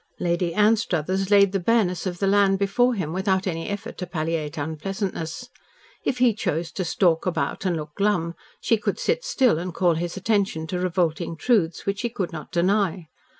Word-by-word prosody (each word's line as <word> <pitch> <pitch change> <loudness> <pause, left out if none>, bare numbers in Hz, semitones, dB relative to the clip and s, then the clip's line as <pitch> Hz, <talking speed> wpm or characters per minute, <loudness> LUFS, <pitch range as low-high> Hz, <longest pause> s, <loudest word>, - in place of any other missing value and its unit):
Lady 170 0 0
Anstruthers 195 -4 +1
laid 200 -2 +6
the 195 - 0
bareness 190 -3 +1
of 180 -1 -3
the 195 - 0
land 195 0 +4
before 240 +6 +2
him 160 -6 -3
without 190 0 0
any 165 -3 -3
effort 205 0 -5
to 180 - -4
palliate 160 -2 -3
unpleasantness. 170 +7 -4 0.5
If 255 - -1
he 245 -2 +4
chose 165 -5 -2
to 190 - -3
stalk 170 0 +1
about 185 +1 -1
and 175 -2 0
look 150 -1 -7
glum, 190 -4 0 0.3
she 230 - +2
could 210 - -2
sit - - 0
still 265 - +2
and 175 -1 -5
call 175 -3 +3
his 170 +3 -3
attention 195 -5 0
to 180 - 0
revolting 175 -2 -1
truths 185 -7 +1
which 200 0 -1
he 240 - -1
could 195 -6 -3
not 155 -1 -8
deny. 185 -1 +1
185 Hz, 185 wpm, -24 LUFS, 165-205 Hz, 0.5 s, laid